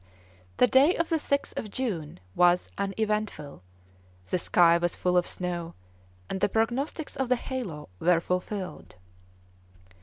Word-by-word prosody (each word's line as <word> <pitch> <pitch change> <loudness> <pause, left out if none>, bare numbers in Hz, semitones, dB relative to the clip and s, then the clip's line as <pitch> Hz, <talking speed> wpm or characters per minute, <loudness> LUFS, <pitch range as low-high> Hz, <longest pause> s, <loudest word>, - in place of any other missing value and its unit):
The - - +6
day 270 +8 +5
of 335 - -1
the 325 - +2
6th 280 -2 -1
of 215 - -6
June 190 - -3
was 175 - +4
uneventful; 200 - -2 0.7
the 185 - +1
sky 170 -1 +4
was 175 0 -1
full 180 0 0
of 175 -1 +3
snow, 175 -2 -4 0.5
and 190 - -4
the 205 - +3
prognostics 250 - -1
of 265 -2 -2
the 255 - +4
halo 235 - -5
were 175 -1 +4
fulfilled. 180 - -4
195 Hz, 140 wpm, -27 LUFS, 175-250 Hz, 0.7 s, The